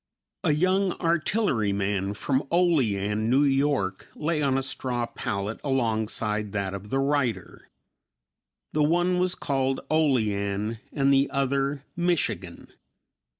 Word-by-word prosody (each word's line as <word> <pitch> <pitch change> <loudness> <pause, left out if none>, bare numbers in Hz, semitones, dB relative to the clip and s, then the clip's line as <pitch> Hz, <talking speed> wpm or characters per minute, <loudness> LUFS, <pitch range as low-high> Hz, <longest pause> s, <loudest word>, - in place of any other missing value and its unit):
A 150 - +3
young 185 +4 +2
artilleryman 105 - 0
from 130 +6 -1
Olean, 110 - +1
New 135 +4 +4
York, 135 -9 0
lay 155 0 -1
on 135 -2 +2
a 135 - -1
straw 125 -2 -2
pallet 105 -2 -4
alongside 110 -5 -1
that 100 -2 -2
of 100 +1 -7
the 135 - 0
writer. 135 -3 -1 1.0
The 155 - +1
one 175 +4 +2
was 180 0 +1
called 135 -1 -1
"Olean" 110 -8 +1
and 140 -1 +2
the 135 0 +3
other 140 0 0
"Michigan." 170 - -2
135 Hz, 115 wpm, -26 LUFS, 105-150 Hz, 1.0 s, New